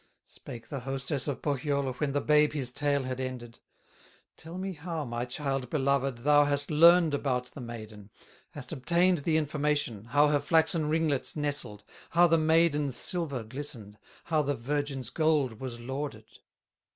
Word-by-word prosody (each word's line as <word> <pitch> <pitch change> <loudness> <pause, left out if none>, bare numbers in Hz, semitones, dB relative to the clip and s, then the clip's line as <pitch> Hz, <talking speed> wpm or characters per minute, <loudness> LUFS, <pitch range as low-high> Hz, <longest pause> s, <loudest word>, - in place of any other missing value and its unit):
Spake 115 -2 -11
the 140 - -4
hostess 135 +2 -3
of 140 - -4
Pohyola, 140 -1 -1
When 140 +2 -2
the 145 +1 0
babe 150 0 +3
his 135 -5 -2
tale 145 +1 0
had 130 0 -4
ended: 125 -3 -6 0.8
"Tell 165 +2 -9
me 190 0 -4
how, 160 -1 -5
my 120 0 -3
child 135 0 -3
beloved, 135 -3 0
Thou 145 0 +6
hast 145 0 -1
learned 165 +1 +6
about 125 -3 -1
the 140 - -8
maiden, 110 -3 -9 0.4
Hast 130 -4 -7
obtained 170 +4 +2
the 155 +2 +1
information, 150 -7 -1
How 145 +5 +3
her 145 -1 +2
flaxen 160 +1 +3
ringlets 155 -4 0
nestled, 145 -8 -3 0.3
How 175 +1 +5
the 165 -1 +4
maiden's 155 -4 +2
silver 160 - -2
glistened, 110 -4 -8 0.2
How 155 -2 +1
the 145 -1 -1
virgin's 135 0 -3
gold 150 -8 +1
was 125 -3 -6
lauded. 130 -2 -5
145 Hz, 155 wpm, -29 LUFS, 125-155 Hz, 0.8 s, Thou